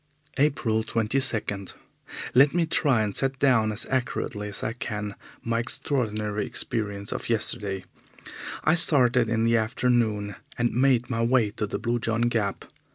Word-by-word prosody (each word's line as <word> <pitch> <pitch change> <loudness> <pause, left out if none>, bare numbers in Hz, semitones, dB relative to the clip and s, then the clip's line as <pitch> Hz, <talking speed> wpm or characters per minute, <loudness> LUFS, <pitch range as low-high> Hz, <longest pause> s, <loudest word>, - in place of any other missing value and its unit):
April 130 -6 +2
22. 110 -3 -1 0.7
Let 140 +5 +5
me 175 -1 +3
try 140 -7 +2
and 105 -2 -3
set 135 0 0
down 120 -5 +3
as 110 +3 -2
accurately 120 -4 -2
as 100 - -5
I 110 - -1
can 105 -4 -4 0.3
my 115 0 0
extraordinary 110 -4 -2
experience 100 -2 -3
of - - -4
yesterday. 100 -4 +1 0.8
I 155 - +4
started 125 -8 +4
in 115 0 +1
the 115 0 +3
afternoon, 110 -3 0 0.2
and 120 0 0
made 125 -1 +2
my 115 -1 0
way 115 -3 +2
to 105 0 -3
the - - -3
Blue 120 0 -1
John 115 0 -1
Gap. 115 -4 0
115 Hz, 150 wpm, -26 LUFS, 105-125 Hz, 0.8 s, Let